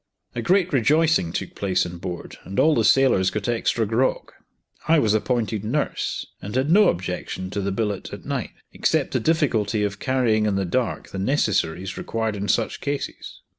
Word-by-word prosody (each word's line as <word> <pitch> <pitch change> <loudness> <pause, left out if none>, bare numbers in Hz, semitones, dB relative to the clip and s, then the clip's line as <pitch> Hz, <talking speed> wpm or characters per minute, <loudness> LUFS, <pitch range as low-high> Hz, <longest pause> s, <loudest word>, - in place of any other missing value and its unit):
A 120 - -3
great 185 - +2
rejoicing 150 - +3
took - - -4
place 95 -2 0
on 85 0 -7
board, 90 -1 -6
and 95 +1 -4
all 160 - +5
the - - +2
sailors 130 -9 +4
got 100 +1 -3
extra 115 -1 +1
grog. 115 +5 0 0.6
I 165 +1 +5
was 110 -8 +3
appointed 110 -2 0
nurse, 135 +7 -2 0.2
and 100 +5 -6
had 135 +4 +1
no 205 +2 +6
objection 95 +1 -4
to 100 - -2
the 100 0 -1
billet 105 -1 -2
at - - -9
night, - - -2 0.2
except - - +1
the - - +1
difficulty 120 -10 +1
of 100 -1 -2
carrying 120 -5 +1
in 100 - +1
the 95 0 0
dark 120 +7 -2
the 95 - -6
necessaries 95 - 0
required 110 -2 -2
in 100 0 -4
such 115 +1 0
cases. 140 0 -5
110 Hz, 180 wpm, -23 LUFS, 95-135 Hz, 0.6 s, no